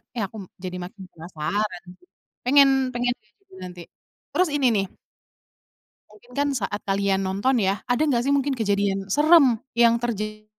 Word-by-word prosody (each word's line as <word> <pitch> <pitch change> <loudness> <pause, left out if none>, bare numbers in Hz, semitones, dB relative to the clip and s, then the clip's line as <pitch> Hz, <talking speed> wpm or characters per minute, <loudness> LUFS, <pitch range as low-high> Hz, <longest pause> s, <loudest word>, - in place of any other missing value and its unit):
Eh 230 - -1
aku 220 - -12 0.3
jadi 180 -1 -5
makin 190 +2 -10
penasaran, 180 +4 -4 0.6
pengen 280 +2 +6 0.3
pengen 245 0 0
liat 215 -1 -36
juga 390 -1 -20
nanti. 180 -1 -9 0.5
Terus 365 -2 +2
ini 275 -3 +2
nih 195 -1 +1 1.2
mungkin 215 +3 -20
kan 285 +2 0
saat 205 -3 -3
kalian 195 0 +1
nonton 200 +7 +1
ya, 195 +1 0
ada 245 +2 +1
gak 240 -4 +1
sih 280 - +1
mungkin 280 -1 +1
kejadian 200 -3 -1
serem 295 - +5 0.2
yang 235 0 +4
terja 215 -2 -4
215 Hz, 155 wpm, -24 LUFS, 195-250 Hz, 1.2 s, pengen